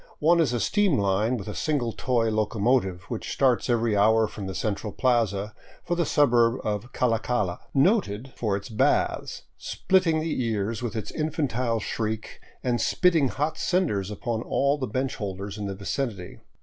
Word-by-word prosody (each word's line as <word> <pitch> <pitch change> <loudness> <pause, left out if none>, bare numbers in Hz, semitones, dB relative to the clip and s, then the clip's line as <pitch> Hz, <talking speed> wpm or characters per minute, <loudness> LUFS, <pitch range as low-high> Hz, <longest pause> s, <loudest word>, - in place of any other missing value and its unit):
One 170 +3 +4
is 155 -7 +3
a 120 - -1
steam 200 - +2
line 105 +4 +1
with 105 - -7
a 105 - -4
single 135 -5 -1
toy 115 -2 0
locomotive, 110 -3 +1
which 110 +2 -5
starts 130 -2 +2
every 115 -2 +2
hour 110 +2 +4
from 100 -2 -7
the 95 - -5
central 105 0 -2
plaza, 110 -4 +1 0.3
for 175 - -2
the 170 -3 0
suburb 120 -5 +4 0.4
Calacala, 115 -7 0
" - - -33 0.2
noted 130 - -3
" - - -29
for 105 -4 0
its 100 - -8
baths, 110 -2 0 0.2
splitting 180 -4 +1
the 155 -5 -1
ears 110 0 -2
with 120 -2 -4
its 110 - -4
infantile 130 -7 -1
shriek 110 0 -4 0.2
and 120 -2 0
spitting 170 -6 +3
hot 145 +5 -2
cinders 125 - 0
upon 110 +2 -3
all 140 +4 +1
the 130 - -2
bench 130 +5 -2
holders 100 0 -5
in 100 - -3
the 100 - -4
vicinity. 100 -1 -4
115 Hz, 170 wpm, -26 LUFS, 105-135 Hz, 0.4 s, One